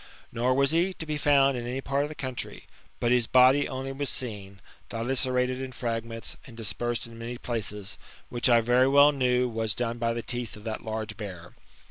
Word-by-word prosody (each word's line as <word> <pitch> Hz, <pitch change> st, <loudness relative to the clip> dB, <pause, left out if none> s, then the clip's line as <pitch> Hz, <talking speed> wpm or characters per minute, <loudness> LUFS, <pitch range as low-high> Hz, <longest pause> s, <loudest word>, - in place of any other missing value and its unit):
Nor 125 Hz, +2 st, +1 dB
was 140 Hz, 0 st, +3 dB
he 175 Hz, +4 st, +2 dB
to 160 Hz, -, -7 dB
be 155 Hz, -1 st, -2 dB
found 140 Hz, -2 st, +4 dB
in 120 Hz, -1 st, -4 dB
any 125 Hz, +2 st, -3 dB
part 135 Hz, +1 st, 0 dB
of 145 Hz, -, -2 dB
the 155 Hz, -, -8 dB
country; 130 Hz, -3 st, -5 dB, 0.4 s
but 120 Hz, -, +1 dB
his 125 Hz, -2 st, +3 dB
body 130 Hz, +3 st, +5 dB
only 135 Hz, +1 st, -4 dB
was 140 Hz, +1 st, -2 dB
seen, 100 Hz, -5 st, -3 dB, 0.3 s
dilacerated 125 Hz, +2 st, 0 dB
in 130 Hz, -1 st, -5 dB
fragments, 115 Hz, -2 st, -4 dB
and 115 Hz, -3 st, -13 dB
dispersed 115 Hz, +2 st, -2 dB
in 115 Hz, 0 st, -10 dB
many 120 Hz, +1 st, -5 dB
places; 105 Hz, -5 st, -4 dB, 0.3 s
which 120 Hz, +1 st, +1 dB
I 120 Hz, -1 st, +6 dB
very 125 Hz, +3 st, +4 dB
well 140 Hz, +2 st, +7 dB
knew 125 Hz, -2 st, +2 dB
was 110 Hz, -2 st, -1 dB
done 120 Hz, -1 st, -2 dB
by 115 Hz, 0 st, +1 dB
the 115 Hz, 0 st, -4 dB
teeth 120 Hz, -2 st, -4 dB
of 105 Hz, -, -12 dB
that 110 Hz, -1 st, -4 dB
[large] 110 Hz, -1 st, -4 dB
bear. 90 Hz, -6 st, -7 dB
120 Hz, 200 wpm, -27 LUFS, 115-130 Hz, 0.4 s, well